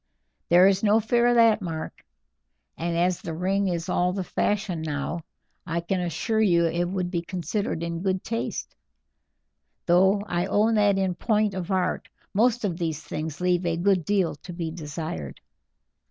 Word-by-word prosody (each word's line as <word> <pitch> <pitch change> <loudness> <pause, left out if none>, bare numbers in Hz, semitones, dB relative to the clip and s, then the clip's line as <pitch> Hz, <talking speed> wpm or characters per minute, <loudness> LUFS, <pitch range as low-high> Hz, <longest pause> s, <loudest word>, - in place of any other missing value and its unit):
"There 175 +2 +7
is 195 0 +2
no 215 +1 +4
fear 235 +2 +2
of 240 - +3
that, 225 -2 +5
Mark; 165 -4 -6 0.7
and 170 0 -2
as 175 +1 +1
the 165 - -5
ring 195 +3 0
is 170 -2 -2
all 180 +1 +1
the 190 -1 -2
fashion 195 -2 -1
now, 150 +1 -3 0.4
I 170 -1 -2
can 185 +2 -1
assure 180 +6 -1
you 170 -5 +4
it 170 +1 0
would 180 0 -2
be 170 -2 -1
considered 175 0 -3
in 170 0 -3
good 190 -1 -1
taste, 230 0 -4 1.1
though 190 +3 +4
I 175 -2 -1
own 215 +3 +2
that 205 -2 +3
in 190 -1 +1
point 210 +2 +1
of 185 -1 -5
art 185 -2 -1 0.2
most 235 +2 +2
of 175 -3 -2
these 160 -2 -2
things 155 0 -5
leave 180 0 +2
a 170 -1 0
good 185 0 +2
deal 190 0 +1
to 175 - -10
be 170 -2 -4
desired. 150 - -6
180 Hz, 170 wpm, -25 LUFS, 170-200 Hz, 1.1 s, There